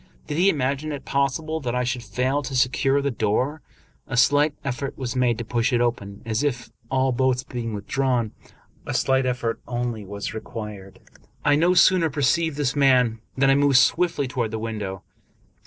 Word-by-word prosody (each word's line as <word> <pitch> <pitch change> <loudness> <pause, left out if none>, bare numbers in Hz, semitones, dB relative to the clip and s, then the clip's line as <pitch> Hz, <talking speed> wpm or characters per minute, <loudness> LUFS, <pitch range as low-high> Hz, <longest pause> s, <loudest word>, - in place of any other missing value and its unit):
Did 150 +1 -3
he 190 +2 +5
imagine 140 0 -1
it 145 - -6
possible 140 +4 -1
that 125 -4 -3
I 125 - +1
should 125 0 -2
fail 130 +4 -1
to 135 -1 -5
secure 135 +2 +2
the 140 - 0
door? 125 +7 -1 0.5
A 125 -4 -3
slight 145 +3 +4
effort 140 0 -4
was 130 -2 -4
made 125 -3 +2
to 120 - -5
push 120 +3 0
it 120 - +2
open, 105 -4 -2
as 110 +1 -1
if, 120 -5 -2 0.2
all 130 0 +1
bolts 130 0 +1
being 115 -4 -5
withdrawn, 120 +2 -1 0.6
a - - -2
slight 130 -1 +2
effort 120 -2 -2
only 120 -3 -3
was 100 +2 -6
required, 105 -3 -8 0.4
I 145 - +5
no 175 +4 +3
sooner 180 -2 +5
perceived 150 +2 +1
this 140 -3 0
than 125 -5 +3 0.2
I 135 0 +6
moved 140 -1 +4
swiftly 165 -1 +2
toward 125 -4 -2
the 110 - -4
window. 105 -4 -5
130 Hz, 175 wpm, -24 LUFS, 115-140 Hz, 0.6 s, I